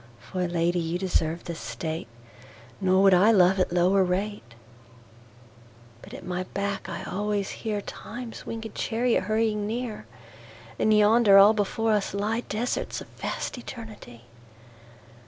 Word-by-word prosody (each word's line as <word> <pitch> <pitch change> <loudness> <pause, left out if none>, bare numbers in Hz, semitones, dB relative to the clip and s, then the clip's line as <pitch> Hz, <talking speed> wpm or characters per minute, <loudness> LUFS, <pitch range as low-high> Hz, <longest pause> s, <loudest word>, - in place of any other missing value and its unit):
For 180 +7 -3
Lady 175 +1 0
you 165 +1 -2
deserve 170 -3 -1
this 170 -1 -6
State; 120 +7 -5 0.7
Nor 190 0 +3
would 195 -1 +6
I 185 +4 +6
love 190 -3 +5
at 185 - +1
lower 180 +2 +3
rate. 185 - -3 1.5
But - - -11
at 185 - -10
my 180 0 -2
back 200 0 -2
I - - -5
alwaies 205 +1 -3
hearTimes 225 +2 -5
winged 225 -1 -6
Charriot 230 -3 0
hurrying 215 -1 0
near:And 115 - -5
yonder 210 -1 +6
all 200 +2 +8
before 220 +2 0
us 205 -3 0
lyeDesarts 220 +3 -2
of - - -11
vast - - -5
Eternity. 220 - -10
195 Hz, 125 wpm, -26 LUFS, 175-215 Hz, 1.5 s, all